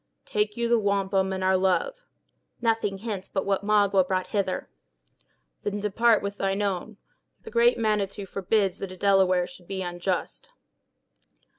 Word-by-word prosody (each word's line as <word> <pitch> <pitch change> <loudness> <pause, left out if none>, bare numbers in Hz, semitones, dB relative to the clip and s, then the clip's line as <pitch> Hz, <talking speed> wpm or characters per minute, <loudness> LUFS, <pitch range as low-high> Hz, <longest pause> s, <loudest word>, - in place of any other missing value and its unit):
"Take 210 0 -1
you 235 0 0
the 235 0 +3
wampum, 195 -2 +1
and 190 0 -3
our 190 0 +3
love." - - 0 0.5
"Nothing 225 -4 0
hence 195 -2 -5
but 190 - -2
what 195 0 0
Magua 200 -2 +4
brought 185 0 -1
hither." 200 -3 -2 0.9
"Then 205 0 -3
depart 215 +2 +3
with 200 0 -4
thine 195 +1 0
own. 200 +1 -3 0.5
The - - -10
Great 235 +1 +4
Manitou 210 -3 -1
forbids 195 0 0
that 195 - -5
a 185 - -9
Delaware 190 -2 +3
should 180 0 -14
be 190 -1 -3
unjust." 175 +1 -3
200 Hz, 150 wpm, -26 LUFS, 190-210 Hz, 0.9 s, Magua